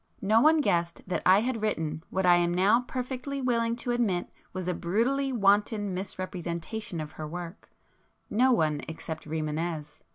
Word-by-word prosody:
No 215 +3 +4
one 310 +2 +5
guessed 170 -9 0
that 185 - -1
I 190 +3 +7
had 235 -1 -2
written 160 -7 -2
what 190 0 0
I 175 -1 +7
am 175 0 +2
now 195 +7 +4
perfectly 260 +2 -4
willing 235 -3 +1
to 245 +1 -3
admit 215 -8 0 0.2
was 185 -1 -5
a 180 - +1
brutally 240 +11 0
wanton 205 -2 +2
misrepresentation 185 +1 -4
of 155 -1 -5
her 155 - -6
work,—no 180 +7 -3
one, 155 - +2
except 160 -1 -7
Rimânez. 155 0 -3
190 Hz, 155 wpm, -28 LUFS, 170-235 Hz, 0.2 s, I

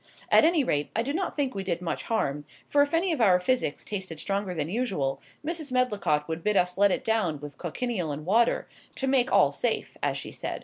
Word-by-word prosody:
At - - +7
any 325 -3 +4
rate, 145 - 0
I 225 - +1
do 280 +4 -2
not 365 +3 -2
think 280 -3 0
we 195 - -3
did 175 -3 -1
much 175 -2 -4
harm; 150 -11 0 0.2
for 290 - +3
if 285 0 +2
any 340 +2 +2
of 300 -7 -1
our 185 -5 +5
physics 180 - -1
tasted 185 -6 -5
stronger 195 -1 -2
than 150 -2 -1
usual, 185 - -1 0.2
Mrs. 315 -3 -3
Medlicott 210 -12 +1
would 165 0 -4
bid 210 -1 +2
us 180 0 +2
let 200 +1 +5
it - - -1
down 215 -10 +1
with 145 0 -10
cochineal 180 -1 -2
and 150 +1 -6
water, 225 +6 +2 0.3
to 270 - -2
make 265 -1 +2
all - - +5
safe, - - -2
as - - 0
she - - -6
said. - - -5
200 Hz, 225 wpm, -27 LUFS, 165-255 Hz, 0.3 s, At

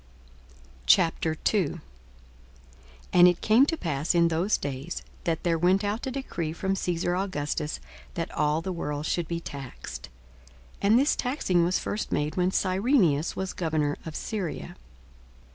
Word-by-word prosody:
42:002:001 165 - +2 1.3
And 180 0 +8
it 175 -1 +3
came 235 +6 +5
to 325 - 0
pass 160 - -1
in 170 -1 +5
those 170 +6 +1
days, 140 +4 -5 0.2
that 165 -1 -1
there 165 -2 +1
went 185 +4 +3
out 210 +5 -2
a - - 0
decree 245 - -3
from 190 +3 -1
Caesar 175 -1 -1
Augustus 150 -5 -2 0.4
that - - -3
all 150 +2 +1
the 185 - -3
world 150 -3 -3
should 170 0 -1
be 170 -1 -2
taxed. 140 - -8 0.7
42:002:002 200 - +2
(And 220 - +7
this 285 +3 +3
taxing 245 - +1
was 175 +2 +2
first 210 - -3
made 150 +1 -1
when 180 0 +2
Cyrenius 185 - +2
was 190 -1 -3
governor 155 -4 0
of 160 -1 -7
Syria.) 180 -4 -4
175 Hz, 145 wpm, -27 LUFS, 155-195 Hz, 1.3 s, And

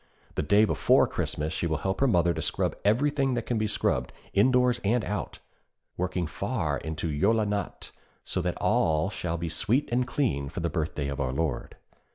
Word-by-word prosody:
The - - -1
day 100 +8 +4
before - - +4
Christmas 75 +1 -3
she 85 - -1
will 80 -2 0
help 95 +5 -2
her 135 - +4
mother 85 -6 +3
to - - -4
scrub - - -1
everything 135 +4 +2
that 120 - -2
can 120 -3 -1
be 110 - +1
scrubbed, 65 -11 0 0.2
indoors 125 +3 +3
and 110 +3 +1
out, 105 - -4 0.6
working 90 0 -1
far - - -2
into 80 +1 -4
'Jóla 105 +9 +2
Natt,' 100 -1 -4 0.3
so - - -2
that - - -2
all 80 +4 +2
shall 85 -4 -3
be 85 +1 -3
sweet 105 - 0
and 125 +1 +1
clean 70 - -1
for 85 - -5
the 85 - -1
birthday 75 -3 -2
of 70 0 -3
our 65 -2 0
Lord. 70 -1 -2
95 Hz, 190 wpm, -27 LUFS, 80-115 Hz, 0.6 s, day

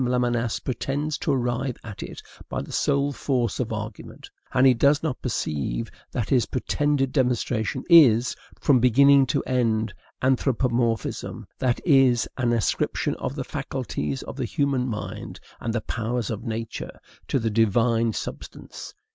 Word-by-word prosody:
Lamennais 120 -2 0
pretends 140 +4 -2
to - - 0
arrive 125 0 -1
at 105 -3 -8
it - - -8 0.3
by - - -2
the - - -10
sole 140 0 +1
force 125 -6 -1
of 120 -3 -2
argument; 110 -1 -7 0.2
and 125 - +4
he 130 - +7
does 140 +5 +3
not 155 -5 -2
perceive 75 - -2 0.2
that 115 - -2
his 125 -4 +3
pretended 140 +1 0
demonstration 125 -5 0
is, 130 -9 +6 0.2
from 135 -3 +4
beginning 135 +3 +6
to - - 0
end, 115 -4 0 0.3
anthropomorphism, 125 -3 0
that 125 -2 +1
is, 135 -6 +4
an 120 -2 0
ascription 115 -3 0
of - - -4
the - - -3
faculties 70 -2 -4
of - - -8
the - - -1
human 140 -3 0
mind 110 -3 -6 0.2
and 115 - -2
the 120 0 -1
powers 115 +1 -2
of 110 +3 -5
nature 115 0 -5 0.3
to - - +1
the 115 -3 -1
Divine 115 +1 +2
substance. - - -7
120 Hz, 145 wpm, -25 LUFS, 115-135 Hz, 0.3 s, he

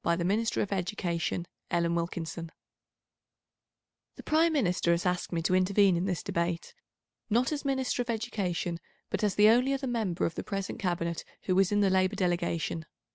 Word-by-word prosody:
§ 170 0 +2
The 170 - -1
Minister 215 +4 +1
of 205 - -6
Education 175 -2 -2 0.3
(Miss 170 0 +2
Wilkinson) 170 -1 -3 1.6
The - - -11
Prime 325 +2 +3
Minister 180 - +1
has 170 +2 -1
asked 180 -1 0
me 165 -2 -1
to 180 - +1
intervene 190 +1 +4
in 175 +2 0
this 180 -3 -2
Debate, 170 - -2 0.6
not 240 +6 +2
as 295 -1 -2
Minister 265 -3 0
of 245 - -5
Education, 190 -7 -2 0.3
but - - -1
as 205 -2 +1
the 210 +1 +7
only 250 +4 +4
other 270 0 -2
member 225 -8 -1
of 165 - -1
the - - -5
present 195 -1 -4
Cabinet 170 -3 -1 0.2
who 185 - 0
was 190 0 +3
in 205 0 +3
the 195 -2 +3
Labour 185 +1 +2
delegation. 170 -3 -1
185 Hz, 180 wpm, -29 LUFS, 170-220 Hz, 1.6 s, the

